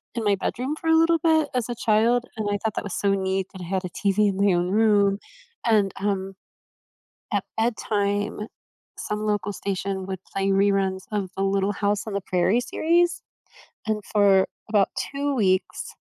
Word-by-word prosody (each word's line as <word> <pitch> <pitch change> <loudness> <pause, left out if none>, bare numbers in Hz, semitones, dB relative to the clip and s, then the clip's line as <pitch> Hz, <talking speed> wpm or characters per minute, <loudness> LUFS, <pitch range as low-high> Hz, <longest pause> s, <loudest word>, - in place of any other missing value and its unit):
in 230 - -2
my 205 -1 +3
bedroom 255 +8 -3
for 325 - -4
a 320 - +6
little 330 0 +4
bit, 315 -2 +3
as 250 -2 -1
a 240 - -2
child. 230 +2 +2
And, 215 -1 -2
I 205 - +1
thought 220 -1 0
that - - -2
was 200 - -5
so 200 -1 +2
neat 190 -1 -1
that 190 - -9
I - - -6
had 190 0 -1
a 180 - -4
TV 205 +2 +1
in 190 - -3
my 200 -1 +3
own 175 +1 0
room. 205 -2 +3 0.5
And, 210 -4 +3
um, 195 -1 -2 1.0
at - - 0
bedtime, 210 -2 -1 0.5
some 210 0 -3
local 205 -1 -1
station 195 -1 -3
would 190 -2 -5
play 195 0 0
reruns 195 -1 +2
of 200 -3 -2
the 195 - -1
Little 195 +1 +1
House 205 +1 -1
on 215 - -5
the 200 - 0
Prairie 185 +6 +2
series. 340 +6 +1 0.7
And, 215 -1 -1
for 200 -2 +5 0.2
about 205 -2 +3 0.2
2 285 0 -1
weeks, 190 -6 0
205 Hz, 185 wpm, -24 LUFS, 195-220 Hz, 1.0 s, a